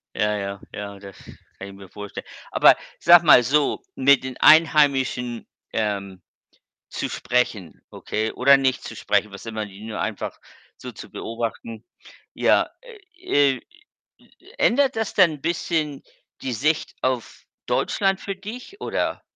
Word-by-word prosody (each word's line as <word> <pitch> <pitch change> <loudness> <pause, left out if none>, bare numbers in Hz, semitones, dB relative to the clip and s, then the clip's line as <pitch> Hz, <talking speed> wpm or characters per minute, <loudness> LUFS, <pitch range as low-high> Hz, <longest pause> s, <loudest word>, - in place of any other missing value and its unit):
Ja, 105 0 0
ja, 100 -1 -5
ja, 100 -1 -7
das 100 -1 -12 0.4
kann 95 - -7
ich 100 - -11
mir 95 -1 -13
vorstellen. 105 +1 -8 0.3
Aber - - +6 0.2
sag 175 0 +7
mal 150 -6 +7
so, 140 +4 +1
mit 140 0 +4
den 130 -1 -6
Einheimischen, 140 -6 +3 0.3
ähm, 100 -4 -3 0.7
zu - - -4
sprechen, 110 -9 -2
okay, 110 +1 -3
oder 140 +2 +5
nicht 130 -1 0
zu - - -8
sprechen, 105 - 0
was 100 - -11
immer 110 -1 -4
die 100 0 -13
nur 110 -1 -5
einfach - - -4 0.4
so - - -9
zu - - -11
beobachten. 115 -1 -6 0.5
Ja, - - +2
äh, 370 - -1
äh, - - -11 1.0
ändert 270 +2 +2
das 220 -2 -2
dann 170 -6 +3
bisschen 160 -2 -2 0.4
die 130 - -3
Sicht 155 +7 -1
auf 130 -3 -3 0.2
Deutschland 195 -1 0
für 195 - -5
dich 235 - -10
oder? - - -2
130 Hz, 140 wpm, -23 LUFS, 105-165 Hz, 1.0 s, sag